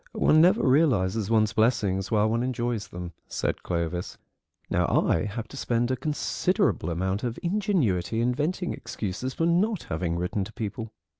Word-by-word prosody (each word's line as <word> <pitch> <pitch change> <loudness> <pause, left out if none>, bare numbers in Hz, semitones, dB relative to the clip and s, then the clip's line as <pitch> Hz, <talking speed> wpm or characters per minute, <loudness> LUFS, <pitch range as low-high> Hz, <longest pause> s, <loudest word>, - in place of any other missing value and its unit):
"One 155 - +4
never 185 +2 +4
realises 115 - +2
one's 110 -2 +3
blessings 100 -4 +1
while 110 -1 +3
one 115 +2 0
enjoys 120 -4 -2
them," 90 -2 -7
said - - -2
Clovis; 85 0 -3 0.5
"now - - +1
I 80 - +2
have 110 +2 -5
to 140 - -10
spend 120 -1 0
a - - +1
considerable 180 - 0
amount 95 +5 -1
of 120 -2 -2
ingenuity 170 - 0
inventing 145 +10 0
excuses 110 +6 -5
for 165 - +1
not 180 +4 +2
having 85 +1 -1
written 90 +3 -1
to 110 - -9
people." 110 0 -5
115 Hz, 155 wpm, -26 LUFS, 95-140 Hz, 0.5 s, One